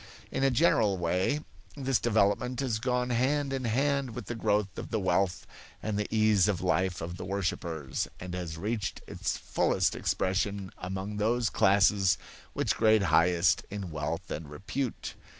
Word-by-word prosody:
In 135 - -1
a 135 - +5
general 115 - +3
way, 90 - 0 0.4
this 135 -4 +1
development 110 +3 +1
has 125 -5 0
gone 125 0 0
hand 135 +3 +1
in 130 -2 -2
hand 135 +1 0
with - - -6
the - - -4
growth 105 -3 0
of - - -6
the 110 - 0
wealth 95 -1 +1 0.4
and 110 -1 -2
the 105 0 -1
ease 110 -4 +4
of 100 -4 0
life 90 0 0
of 85 +2 -5
the - - -6
worshippers 85 -7 -2
and 90 0 -6
has 85 -3 -4
reached 105 +2 -3
its - - -2
fullest - - +1
expression 95 0 -1
among 95 +3 -4
those 115 +2 +1
classes 100 -1 +4 0.4
which - - 0
grade 110 -2 +4
highest 85 +2 +4
in 100 -4 -5
wealth 80 +2 -4
and 75 -1 -5
repute. 110 - -4
100 Hz, 160 wpm, -29 LUFS, 90-120 Hz, 0.4 s, a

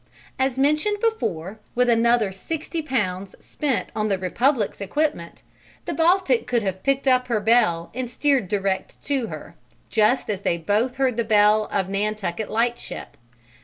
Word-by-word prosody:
As 265 -1 +1
mentioned 305 +10 +2
before, 215 - -2 0.2
with 250 0 +3
another 235 -3 +3
60 320 - -4
Pounds 200 -9 -2
spent 285 -5 -2
on 215 0 0
the 195 - +1
Republic's 210 +5 0
equipment, 200 - -2 0.4
the - - -3
Baltic 335 -6 +2
could 240 -3 +1
have 190 -1 -3
picked 275 +2 0
up 255 -1 +3
her 230 -3 +1
bell 210 -6 +2
and 250 0 -4
steered 265 -3 +1
direct 195 -1 -2
to 270 -5 -1
her - - -9 0.4
just 220 +3 +2
as 200 -3 -3
they 170 - 0
both 210 +9 0
heard 260 -3 0
the 235 - +1
bell 215 -1 +4
of 195 -2 0
Nantucket 205 0 -2
Lightship. 235 +2 -2
230 Hz, 155 wpm, -23 LUFS, 200-265 Hz, 0.4 s, bell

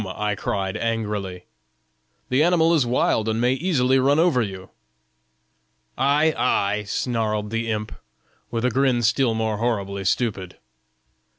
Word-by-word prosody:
I 105 +2 -3
cried, 95 -1 -3
angrily; 105 -5 -3 0.8
'the 130 +3 +2
animal 170 0 +3
is 145 -7 +2
wild 110 -2 +1
and 110 +1 -1
may 125 +2 +2
easily 135 -4 +1
run 140 +3 +3
over 160 -6 +3
you.' 95 -3 -6 1.2
'Ay, 150 +4 +2
ay!' 105 -3 0
snarled 110 -2 -2
the 115 0 -2
imp, 110 -1 -3 0.6
with 115 +1 -2
a 125 - +2
grin 130 -1 +1
still 115 +1 +2
more 110 -1 -1
horribly 100 -4 -2
stupid. 100 -3 -2
115 Hz, 130 wpm, -23 LUFS, 105-130 Hz, 1.2 s, animal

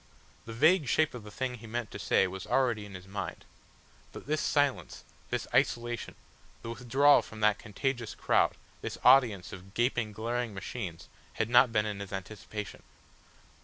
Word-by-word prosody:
The 115 - -8
vague 155 +5 +4
shape 155 +5 +2
of 120 -3 -8
the 105 - -10
thing 125 +4 -3
he 115 - -11
meant 120 0 -4
to - - -7
say 95 0 +3
was 95 0 -6
already 120 -6 +1
in 100 - -10
his 90 0 -10
mind. 100 +1 -6 0.7
But - - -10
this 155 +1 0
silence, 145 -2 0 0.3
this - - -2
isolation, 120 -1 0 0.5
the 115 - -5
withdrawal 135 +5 +4
from 110 - -11
that 105 -1 +3
contagious 120 +2 -3
crowd, - - +2 0.2
this - - -5
audience 120 -8 +5
of 95 +2 -11
gaping, 120 -2 +1
glaring 115 +1 -3
machines, 95 -4 -6 0.3
had 110 0 -1
not 125 0 +6
been 105 -1 +2
in 105 -2 -4
his 100 -1 -7
anticipation. 100 0 -6
115 Hz, 165 wpm, -30 LUFS, 100-125 Hz, 0.7 s, not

